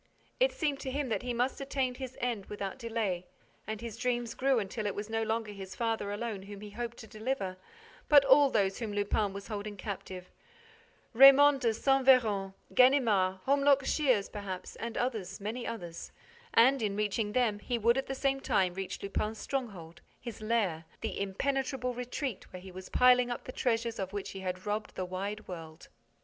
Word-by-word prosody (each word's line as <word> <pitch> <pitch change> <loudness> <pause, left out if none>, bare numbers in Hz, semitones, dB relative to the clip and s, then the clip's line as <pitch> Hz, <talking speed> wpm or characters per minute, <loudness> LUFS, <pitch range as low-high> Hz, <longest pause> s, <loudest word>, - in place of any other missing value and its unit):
It - - +4
seemed 290 -4 -1
to 270 - -4
him 275 0 -2
that 220 - -1
he 250 0 -3
must 245 +3 -1
attain 270 -2 -1
his 260 0 -7
end 235 -5 -2
without 200 +2 -5
delay 220 -7 -2 0.4
and 220 0 -4
his 230 -2 -6
dreams 240 -1 -1
grew 265 0 +2
until 210 0 -2
it 200 - -2
was 210 +2 -5
no 225 0 0
longer 220 -1 -1
his 190 -2 -8
father 225 -3 -1
alone 210 -1 -4
whom 200 +1 -10
he 210 -1 -9
hoped 235 +2 -5
to 225 - -10
deliver, 215 -4 -3 0.5
but 285 -2 +8
all 275 +1 +7
those 195 -5 +1
whom 225 -3 -3
Lupin 205 0 0
was 200 +1 -7
holding 210 -1 -5
captive: 185 -2 -7 0.8
Raymonde 275 +3 +8
de 235 -3 +2
Saint 270 +3 +2
Véran, 210 -7 +4 0.2
Ganimard, 220 -8 +4
Holmlock 280 0 +4
Shears, 255 -11 +2
perhaps, 195 -3 -6
and 230 +1 -5
others, 225 -7 -2
many 220 +4 -4
others; 175 -7 -6 0.4
and, 260 +3 +5
in 205 -2 -1
reaching 210 0 -1
them, 235 -5 +2
he 240 +3 -2
would, 235 +1 +3
at 270 0 -2
the 270 - -3
same 270 0 0
time, 195 -9 +1
reach 190 +1 -5
Lupin's 210 +2 -2
stronghold, 200 -12 -5 0.2
his 235 -3 -8
lair, 210 -8 0 0.2
the - - -3
impenetrable 255 +5 -1
retreat 250 -1 -5
where 185 - -8
he 190 +1 -11
was 185 +1 -9
piling 250 -1 +5
up 240 - -4
the - - -7
treasures 230 -2 -1
of 190 0 -4
which 205 -1 -4
he 195 - -7
had 185 0 -4
robbed 210 +1 -3
the 185 - -2
wide 200 +4 -5
world. 165 -3 -9
225 Hz, 190 wpm, -31 LUFS, 200-255 Hz, 0.8 s, but